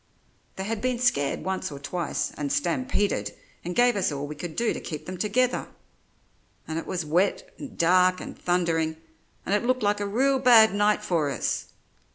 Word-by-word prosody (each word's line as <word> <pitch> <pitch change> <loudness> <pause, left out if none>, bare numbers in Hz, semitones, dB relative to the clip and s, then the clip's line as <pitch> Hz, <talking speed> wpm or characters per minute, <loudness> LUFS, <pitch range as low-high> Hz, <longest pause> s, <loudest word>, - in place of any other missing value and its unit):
"They 190 - -4
had 215 +1 -3
been 255 0 0
scared 190 - +1
once 190 -1 -3
or 140 - -7
twice, 155 +3 -3
and 145 -2 -3
stampeded 175 - 0 0.3
and 175 +1 -4
gave 245 0 +4
us 195 -5 0
all 140 0 -4
we 150 - -6
could 160 +1 -7
do 235 -1 +1
to - - -5
keep 155 -1 -7
them 185 - -6
together; 245 +5 +1 1.0
and 160 +1 -2
it - - -8
was 175 -3 -3
wet 175 +6 0
and 285 - -9
dark 185 +2 +4
and - - -8
thundering, 165 -3 0 0.5
and 195 - -1
it 205 - +2
looked 255 -1 0
like 205 0 +2
a 205 - -2
real 265 +6 +2
bad 230 -5 +7
night 210 +1 +2
for 165 -7 0
us. - - -2
185 Hz, 190 wpm, -26 LUFS, 160-220 Hz, 1.0 s, bad